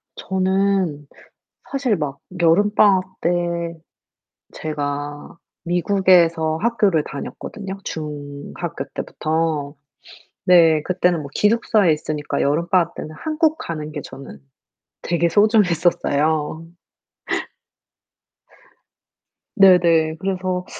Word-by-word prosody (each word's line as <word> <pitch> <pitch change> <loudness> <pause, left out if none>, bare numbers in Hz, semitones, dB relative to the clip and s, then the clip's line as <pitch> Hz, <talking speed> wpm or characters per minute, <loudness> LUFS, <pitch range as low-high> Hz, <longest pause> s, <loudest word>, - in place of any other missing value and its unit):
저는 190 -5 0 0.6
사실 265 -6 0
막 145 -3 -4 0.2
여름 205 +6 +3
방학 190 -3 +4 0.2
때 170 - +1 1.3
제가 145 0 -5 0.3
미국에서 175 -3 +2
학교를 210 -9 +2
다녔거든요, 195 +7 -7
중학교 145 -2 -6
때부터. 155 -2 -2 0.7
네. 165 -4 +5
그때는 180 -2 +1
뭐 140 - -8
기숙사에 210 -4 +3
있으니까 150 -1 -3
여름 160 +5 0
방학 180 -2 +2
때는 155 - -7
한국 315 0 0
가는 155 -2 -5
게 150 - -5
저는 135 - -11 0.6
되게 170 0 0
소중했었어요. 165 -6 +2 2.9
네네. 170 -4 +5
그래서 185 -1 -2
170 Hz, 200 characters per minute, -20 LUFS, 155-190 Hz, 2.9 s, 네